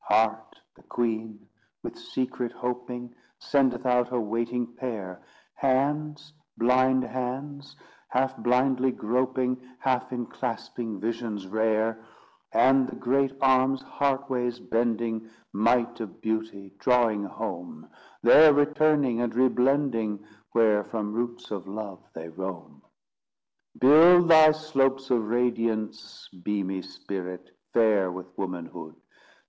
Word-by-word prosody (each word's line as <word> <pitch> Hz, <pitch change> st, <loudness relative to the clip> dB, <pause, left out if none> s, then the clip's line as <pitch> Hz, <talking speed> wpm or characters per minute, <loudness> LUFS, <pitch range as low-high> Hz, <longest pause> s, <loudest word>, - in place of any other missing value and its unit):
Heart, 110 Hz, 0 st, +1 dB
the -, -, -22 dB
queen, 110 Hz, -2 st, -3 dB, 0.4 s
with -, -, -6 dB
secret 125 Hz, -2 st, -4 dB
hoping, 125 Hz, 0 st, -5 dB, 0.2 s
Sendeth 130 Hz, -3 st, +1 dB
out 125 Hz, -1 st, +2 dB
her 125 Hz, 0 st, -2 dB
waiting 115 Hz, +2 st, -2 dB
pair; 110 Hz, -8 st, -6 dB, 0.3 s
Hands, 150 Hz, +3 st, -1 dB, 0.2 s
blind 130 Hz, +2 st, +3 dB
hands, 135 Hz, +3 st, -5 dB, 0.3 s
half 130 Hz, +1 st, 0 dB
blindly 125 Hz, +3 st, +2 dB
groping, 125 Hz, +2 st, -1 dB, 0.2 s
Half 130 Hz, -1 st, -1 dB
inclasping 120 Hz, -2 st, -5 dB
visions 110 Hz, -2 st, -4 dB
rare; 110 Hz, +2 st, 0 dB, 0.5 s
And 135 Hz, 0 st, +4 dB
the -, -, -7 dB
great 135 Hz, +2 st, 0 dB
arms, 130 Hz, 0 st, +3 dB
heartways 130 Hz, -3 st, -1 dB
bending; 115 Hz, -1 st, -1 dB, 0.2 s
Might 115 Hz, +3 st, +1 dB
of 110 Hz, -4 st, -7 dB
Beauty, 110 Hz, -3 st, -4 dB
drawing 115 Hz, -3 st, +2 dB
home 90 Hz, -6 st, -7 dB, 0.4 s
There 155 Hz, -2 st, +8 dB
returning, 145 Hz, -4 st, +2 dB
and 120 Hz, -2 st, -2 dB
re 130 Hz, +1 st, +4 dB
blending, 125 Hz, -6 st, 0 dB, 0.3 s
Where 110 Hz, -3 st, +3 dB
from 105 Hz, -2 st, -4 dB
roots 120 Hz, +1 st, -4 dB
of 100 Hz, -2 st, -5 dB
love 100 Hz, -3 st, -7 dB
they 80 Hz, 0 st, -7 dB
roam. 85 Hz, -4 st, -7 dB, 1.0 s
Build 170 Hz, +6 st, +7 dB
thy 160 Hz, -1 st, +8 dB
slopes 135 Hz, -4 st, 0 dB
of 115 Hz, -4 st, +1 dB
radiance 115 Hz, -2 st, -2 dB, 0.2 s
beamy 95 Hz, -2 st, -2 dB
Spirit, 90 Hz, -1 st, -7 dB, 0.2 s
fair 105 Hz, -5 st, +3 dB
with 90 Hz, 0 st, -9 dB
womanhood! 85 Hz, -4 st, -6 dB
120 Hz, 110 wpm, -26 LUFS, 110-130 Hz, 1.0 s, There